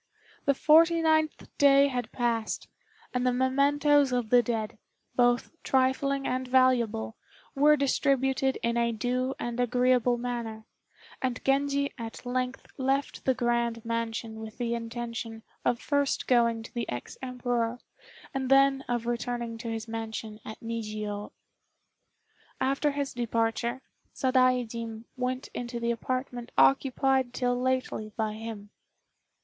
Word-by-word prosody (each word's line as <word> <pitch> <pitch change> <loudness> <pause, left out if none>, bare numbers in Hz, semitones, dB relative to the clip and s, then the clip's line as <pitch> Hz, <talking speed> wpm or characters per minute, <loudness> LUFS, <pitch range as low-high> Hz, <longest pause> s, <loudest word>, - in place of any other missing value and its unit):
The 280 - +3
forty 330 +4 +5
ninth 315 -1 +1
day 280 0 +6
had 250 -4 -3
passed, 230 -3 -1 0.5
and 250 0 0
the 250 - +3
mementoes 280 +2 +3
of 245 -3 -1
the 245 -1 +7
dead, 220 -2 -3 0.4
both 245 -1 +3
trifling 270 +1 +1
and 255 0 -1
valuable, 245 - +2 0.4
were 300 +2 +5
distributed 270 -1 +1
in 235 0 +1
a 235 0 +2
due 250 +4 -1
and 240 0 -4
agreeable 245 0 +3
manner; 235 -3 -4 0.6
and 255 -2 -1
Genji 280 +1 +1
at 230 +1 -7
length 255 +1 -2
left 270 +1 -1
the 260 - +3
grand 235 -1 0
mansion 230 -1 -3
with 220 -1 -8
the 235 -1 -1
intention 230 -1 -5 0.2
of 240 - +1
first 285 -2 0
going 235 -2 +3
to - - -12
the 235 -2 -3
ex 120 0 -5
Emperor, 245 -2 -1 0.6
and 265 -1 -2
then 270 0 +5
of 240 -1 -1
returning 240 -1 -2
to 235 - -6
his 225 0 -4
mansion 225 -1 -5
at 220 - -8
Nijiô. 215 -2 -4 1.3
After 275 +3 +1
his 280 -1 -3
departure, 235 +1 -1 0.3
Sadaijin 245 -4 +1
went 255 +1 -3
into 240 -1 -4
the 235 0 0
apartment 245 0 -3
occupied 255 - +3
till 245 -1 +1
lately 255 -4 -1
by 220 -2 -1
him. 215 -2 -7
245 Hz, 130 wpm, -28 LUFS, 230-265 Hz, 1.3 s, the